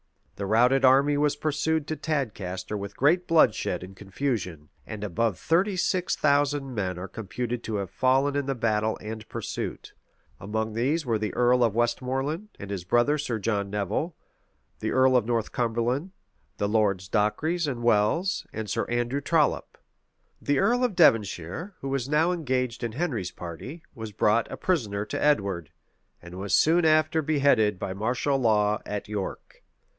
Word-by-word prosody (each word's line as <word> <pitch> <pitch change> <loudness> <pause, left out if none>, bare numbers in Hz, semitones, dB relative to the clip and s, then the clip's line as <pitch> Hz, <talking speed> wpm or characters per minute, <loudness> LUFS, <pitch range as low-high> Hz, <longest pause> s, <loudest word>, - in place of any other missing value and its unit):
[] - - -38
The 100 - -2
routed 125 +5 +4
army 135 +3 +5
was 145 0 +2
pursued 155 +1 -1
to 155 - -3
Tadcaster 105 - -3
with 100 0 -6
great 175 +6 +3
bloodshed 105 - +2
and 95 +1 -10
confusion; 95 - -4 0.2
and 105 -1 -6
above 105 +1 0
thirty 185 +5 +1
six 180 0 0
thousand 145 -2 +1
men 95 -5 -2
are 90 +2 -6
computed 115 +4 -4
to 110 - -3
have 100 -3 -3
fallen 135 +5 +2
in 140 -1 -1
the 135 - -1
battle 110 -2 0
and 110 0 -7
pursuit:[] - - -5 0.5
among 110 +3 -3
these 140 +8 0
were 115 -3 0
the 105 0 -3
earl 125 0 +4
of 115 -3 +1
Westmoreland, 135 - -1
and 100 0 -8
his 95 -3 -4
brother 120 +10 +2
Sir 125 -6 -2
John 100 -2 -1
Nevil, 105 - -2 0.6
the - - -2
earl 130 0 +4
of 120 -3 +2
Northumberland, 120 - -1 0.5
the 100 - 0
Lords 100 -3 +1
Dacres 150 - 0
and 120 -4 -3
Welles, 120 - +1
and 110 -1 -5
Sir - - -1
Andrew 120 +3 -1
Trollop.[] 155 0 +1 0.6
The 145 -1 +1
earl 245 - +2
of 240 -6 0
Devonshire, 115 - +2
who 135 - -4
was 135 -1 -2
now 155 +4 +3
engaged 130 -8 -2
in 115 -2 -3
Henry's 120 - -2
party, 90 - -8
was 110 -4 -7
brought 105 +2 +1
a - - -5
prisoner 105 - -1
to - - -3
Edward; 100 - +1 0.5
and 90 +1 -10
was 95 -2 +1
soon 165 +2 +4
after 155 0 +3
beheaded 140 -9 +2
by 95 0 -4
martial 125 +7 0
law 105 -3 +2
at 105 -1 -4
York. 105 -2 -6
120 Hz, 165 wpm, -26 LUFS, 105-145 Hz, 0.6 s, army